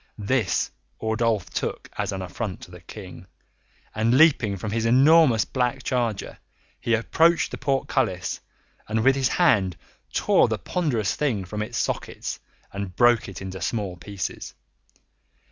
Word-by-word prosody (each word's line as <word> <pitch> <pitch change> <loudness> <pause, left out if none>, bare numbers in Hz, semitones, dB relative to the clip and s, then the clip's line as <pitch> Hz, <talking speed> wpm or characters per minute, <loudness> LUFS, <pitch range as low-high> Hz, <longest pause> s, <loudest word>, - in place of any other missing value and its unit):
This 105 -2 0 0.3
Ordulph 110 -2 0
took - - -3
as - - -2
an 95 -1 -4
affront 95 +1 -5
to - - -11
the 90 -1 -12
King, 90 0 -11 0.7
and, 115 +4 +2
leaping 135 -10 +4
from 105 +3 -4
his 115 +1 -1
enormous 135 -1 +5
black 130 0 -1
charger, 120 -5 -2 0.4
he 115 - +1
approached 165 +9 +2
the - - -6
portcullis 130 -9 -1 0.5
and 110 +1 0
with 135 +1 +5
his 135 -2 +2
hand 100 - +2 0.3
tore - - +3
the - - -1
ponderous 130 - -1
thing 115 -11 -1
from 105 +3 -5
its 120 +3 -4
sockets - - -3 0.3
and 100 -2 -5
broke 120 -3 +4
it 95 - -8
into 95 -1 -6
small 100 -1 -2
pieces. 95 +2 -6
110 Hz, 145 wpm, -24 LUFS, 95-130 Hz, 0.7 s, enormous